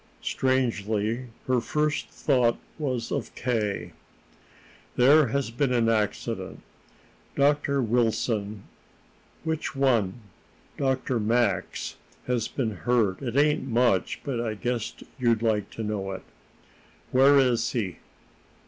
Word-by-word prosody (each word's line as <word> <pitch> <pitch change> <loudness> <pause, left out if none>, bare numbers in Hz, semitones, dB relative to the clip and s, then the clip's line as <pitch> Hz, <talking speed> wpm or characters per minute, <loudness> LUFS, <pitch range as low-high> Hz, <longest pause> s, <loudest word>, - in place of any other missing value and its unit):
Strangely, 115 -2 0 0.2
her 130 -2 +2
first 150 +4 -1
thought 125 -5 +2 0.2
was 130 -6 -2
of - - -3
K. 105 -8 -1 1.0
"There 140 +4 +6
has 135 0 -1
been 130 +2 0
an 115 -2 +3
accident. 110 -2 -2 0.7
Dr. 140 -1 +2
Wilson 110 -3 0 0.4
" - - -33
"Which 160 -2 -2
one?" 120 -9 +2 0.6
"Dr. 130 -2 0
Max 115 +3 0 0.3
has 120 -3 0
been 110 -7 -3
hurt. 115 -5 +1
It 125 -1 -3
ain't 150 -1 +3
much, 120 -6 +1
but 130 -5 -2
I 110 -2 -2
guess 120 +1 -2 0.3
you'd 115 -2 +2
like 105 -3 +1
to 115 - -6
know 100 -2 -3
it." 95 - -7 0.9
"Where 135 +2 +6
is 125 -4 +2
he?" 100 -8 -2
120 Hz, 115 wpm, -26 LUFS, 110-130 Hz, 1.0 s, There